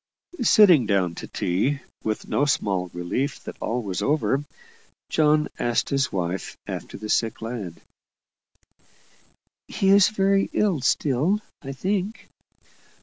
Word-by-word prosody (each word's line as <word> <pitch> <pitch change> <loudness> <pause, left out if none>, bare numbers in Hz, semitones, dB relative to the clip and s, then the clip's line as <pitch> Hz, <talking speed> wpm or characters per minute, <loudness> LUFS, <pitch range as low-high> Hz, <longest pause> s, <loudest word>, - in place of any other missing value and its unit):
Sitting 185 - +6
down 95 -4 +1
to - - -8
tea, 105 +11 -1 0.2
with 110 -1 -3
no 145 - +1
small 95 -10 0
relief 90 +11 -3
that - - -7
all 120 +1 -2
was 95 -3 -3
over, 145 -1 +1 0.7
John 150 -1 +3
asked 120 -1 0
his 140 0 0
wife 90 0 -3
after - - -6
the 110 - -7
sick 115 +1 0
lad. 110 -7 -5 1.9
"He 195 -1 0
is 200 0 +6
very 195 -2 +2
ill 190 -9 +1
still, 150 +11 +1 0.2
I 135 -3 -6
think." 195 - -3
135 Hz, 125 wpm, -24 LUFS, -, 1.9 s, Sitting